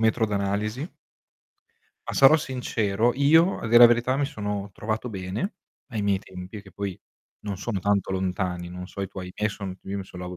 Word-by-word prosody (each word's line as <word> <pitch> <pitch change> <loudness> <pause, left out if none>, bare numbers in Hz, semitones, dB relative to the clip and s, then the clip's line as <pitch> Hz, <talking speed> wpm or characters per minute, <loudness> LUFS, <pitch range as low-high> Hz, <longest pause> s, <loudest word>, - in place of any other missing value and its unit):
metro 110 0 +3
d'analisi. 105 - -1 1.2
Ma - - -2
sarò 135 +3 +7
sincero, 120 -6 0
io 160 +6 +5
a - - -5
dir 120 +2 +6
la 120 - +12
verità 120 +2 +2
mi 140 -1 +1
sono 105 -6 -4
trovato 110 +3 -3
bene 100 - -4 0.4
ai 110 -3 -2
miei 100 -1 +1
tempi, 95 +2 -9
che 100 - -15
poi 100 -3 -4 0.4
non 100 -2 -4
sono 100 -3 -2
tanto 100 -1 +1
lontani, 90 -2 -2
non 90 +1 -7
so 100 - -8
i 95 - -2
tuoi, 95 -2 -7
i - - -10
miei 105 +1 0
son 95 -3 -6
io 100 - -4
mi 95 - -5
son 90 -1 -10
lau 90 0 -6
100 Hz, 195 wpm, -26 LUFS, 95-120 Hz, 1.2 s, la